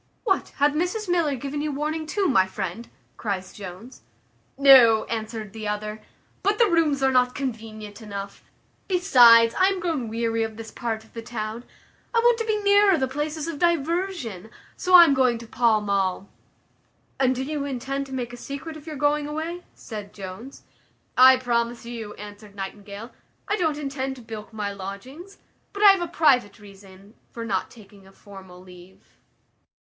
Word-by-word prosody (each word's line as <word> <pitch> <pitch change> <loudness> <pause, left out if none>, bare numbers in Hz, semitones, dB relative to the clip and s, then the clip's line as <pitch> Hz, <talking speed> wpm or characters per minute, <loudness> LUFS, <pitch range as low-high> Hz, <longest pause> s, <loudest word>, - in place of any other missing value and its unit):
"What, 385 -5 0
hath 290 +1 +2
Mrs 360 +7 -2
Miller 335 -5 +1
given 280 +3 -4
you 300 0 -2
warning 305 +2 -3
too, 390 +4 0
my 190 - +3
friend?" 190 +4 -5 0.3
cries 190 -4 -4
Jones. 200 +5 -10 0.6
"No," 260 -5 +7
answered 220 -2 -5
the 220 -1 -6
other; 210 +1 -4 0.4
"but 405 +2 +1
the 465 - +5
rooms 310 -5 +2
are 265 - +4
not 250 -1 +2
convenient 220 -5 -6
enough. 200 -2 -7 0.4
Besides, 240 - +6
I 375 - +6
am 390 -1 0
grown 325 -9 -2
weary 230 0 -1
of 220 -1 -3
this 225 -1 -8
part 225 -2 -4
of 220 - -23
the 230 - -6
town. 225 0 -6 0.5
I - - +5
want 475 0 +4
to 455 - -1
be 435 -1 0
nearer 405 -2 +5
the 265 -3 0
places 300 +3 -3
of 325 -4 -5
diversion; 335 - -1 0.3
so 365 0 +3
I 350 - +12
am 285 - +4
going 255 -3 +2
to 230 - -10
Pall 230 -1 +2
mall." 195 -1 -1 0.9
"And 260 -1 +2
do 260 - -3
you 290 0 -3
intend 275 +1 -4
to 265 - -10
make 245 -2 -4
a - - -8
secret 280 +5 -7
of 310 0 -12
your 310 - -5
going 290 +1 +1
away?" 325 +4 -5
said 210 -3 -8
Jones. 200 +7 -9 0.5
"I 260 +1 +8
promise 235 -2 -1
you," 230 -3 -7
answered 205 0 -11
Nightingale, 200 +3 -8 0.4
"I 415 - +1
don't 320 -7 0
intend 270 -2 -4
to 250 - -13
bilk 220 -1 -9
my 210 -2 -4
lodgings; 250 - -9 0.4
but 405 +1 -2
I 405 - +10
have 390 -2 +1
a 345 - -2
private 270 - +2
reason 200 -1 -16 0.2
for 230 -1 -7
not 195 -4 -2
taking 200 -3 -17
a - - -17
formal 190 -3 -13
leave." 180 0 -16
245 Hz, 175 wpm, -24 LUFS, 215-300 Hz, 0.9 s, I